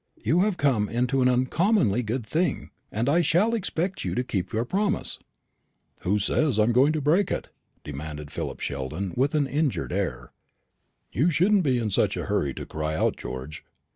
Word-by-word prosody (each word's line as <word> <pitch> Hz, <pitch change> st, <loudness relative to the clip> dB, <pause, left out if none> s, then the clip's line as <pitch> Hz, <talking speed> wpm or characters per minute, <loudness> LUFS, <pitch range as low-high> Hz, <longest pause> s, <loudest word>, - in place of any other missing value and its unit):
You 145 Hz, +11 st, +1 dB
have 200 Hz, -1 st, +2 dB
come 125 Hz, -8 st, +2 dB
into 125 Hz, +3 st, +1 dB
an 125 Hz, -, +4 dB
uncommonly 130 Hz, -, +2 dB
good 120 Hz, +1 st, -3 dB
thing, 165 Hz, +3 st, -1 dB, 0.2 s
and 115 Hz, +4 st, -1 dB
I 160 Hz, +5 st, +4 dB
shall 180 Hz, +8 st, +3 dB
expect 185 Hz, -3 st, -2 dB
you -, -, -2 dB
to 125 Hz, -, 0 dB
keep 95 Hz, -6 st, -3 dB
your 115 Hz, +2 st, 0 dB
promise." 200 Hz, +8 st, -1 dB, 0.8 s
"Who 100 Hz, +4 st, +1 dB
says 120 Hz, +5 st, +1 dB
I 105 Hz, -, +5 dB
am 115 Hz, -, +2 dB
going 130 Hz, +5 st, +4 dB
to 155 Hz, -, -1 dB
break 170 Hz, +7 st, +3 dB
it?" -, -, -3 dB, 0.3 s
demanded 75 Hz, +1 st, -7 dB
Philip -, -, -5 dB
Sheldon 70 Hz, +8 st, -3 dB
with 140 Hz, +5 st, +1 dB
an 150 Hz, -2 st, +3 dB
injured 145 Hz, +1 st, -1 dB
air. -, -, -3 dB, 0.8 s
"You 150 Hz, +8 st, +2 dB
shouldn't 190 Hz, +5 st, +3 dB
be 135 Hz, -7 st, +2 dB
in 110 Hz, -3 st, -1 dB
such -, -, +1 dB
a -, -, -3 dB
hurry 70 Hz, -2 st, 0 dB
to -, -, -6 dB
cry 80 Hz, 0 st, -3 dB
out, -, -, +1 dB
George. 65 Hz, +4 st, -7 dB
125 Hz, 185 wpm, -26 LUFS, 105-165 Hz, 0.8 s, I